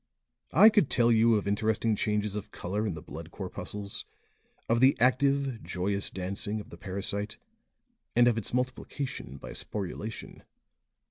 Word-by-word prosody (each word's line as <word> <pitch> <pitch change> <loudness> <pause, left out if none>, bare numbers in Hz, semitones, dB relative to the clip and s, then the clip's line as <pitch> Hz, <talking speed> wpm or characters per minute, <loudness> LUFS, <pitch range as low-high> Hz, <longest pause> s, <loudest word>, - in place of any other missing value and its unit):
I 215 - +9
could 210 - +3
tell 120 -1 +4
you 115 0 +5
of 105 -1 -1
interesting 110 +2 +1
changes 105 -1 0
of 105 0 -5
color 105 +3 -3
in 95 - -2
the 80 - -8
blood 80 +2 -8
corpuscles, 100 +2 -5 0.6
of 115 +1 +3
the 130 +2 +5
active, 135 0 +2
joyous 100 +2 -1
dancing 100 +3 -3
of 105 - -10
the - - -9
parasite, 100 +2 -2 0.8
and 120 0 +6
of 120 - +4
its 115 -3 -3
multiplication 130 - -3
by - - -9
sporulation. 105 +2 -5
105 Hz, 145 wpm, -29 LUFS, 100-120 Hz, 0.8 s, I